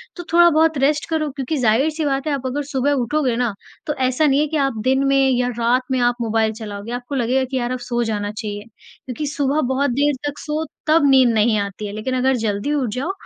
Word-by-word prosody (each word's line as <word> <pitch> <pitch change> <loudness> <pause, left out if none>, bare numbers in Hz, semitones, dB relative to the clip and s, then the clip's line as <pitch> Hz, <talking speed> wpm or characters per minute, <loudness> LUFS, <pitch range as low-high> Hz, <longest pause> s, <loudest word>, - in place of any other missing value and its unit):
तो 350 - -7
थोड़ा-बहुत 325 -2 +5
रेस्ट 290 +2 +1
करो 315 -2 0
क्योंकि 275 +2 -3
ज़ाहिर-सी 275 +7 +1
बात 275 0 -1
है 300 - 0
आप 270 -2 -4
अगर 275 +3 -2
सुबह 270 0 +1
उठोगे 260 0 0
ना, 240 -3 0 0.3
तो 295 - -1
ऐसा 260 +2 +1
नहीं 280 -1 +3
है 300 - +2
कि 315 +1 -2
आप 270 -5 0
दिन 265 +2 +2
में 275 -1 +3
या 250 -1 +1
रात 240 +2 +2
में 260 - +1
आप 245 0 +2
मोबाइल 225 -1 +1
चलाओगे। 205 0 -7
आपको 245 +3 -5
लगेगा 260 +1 +1
कि 260 +1 -3
यार 240 -1 -2
अब 255 - -3
सो 240 0 -2
जाना 205 -2 -2
चाहिए। 210 -1 -6 0.4
क्योंकि 265 +4 -4
सुबह 285 +1 0
बहुत 280 +1 +1
देर 290 +4 +2
तक 290 - -5
सो, 305 +1 -3 0.2
तब 310 -1 +4
नींद 260 -2 +5
नहीं 220 0 +3
आती 200 +1 -4
है 200 - -7
लेकिन 215 +5 -3
अगर 260 +1 +2
जल्दी 205 +7 -1
उठ 270 -5 0
जाओ, 275 +9 -2
260 Hz, 230 wpm, -20 LUFS, 235-290 Hz, 0.4 s, थोड़ा-बहुत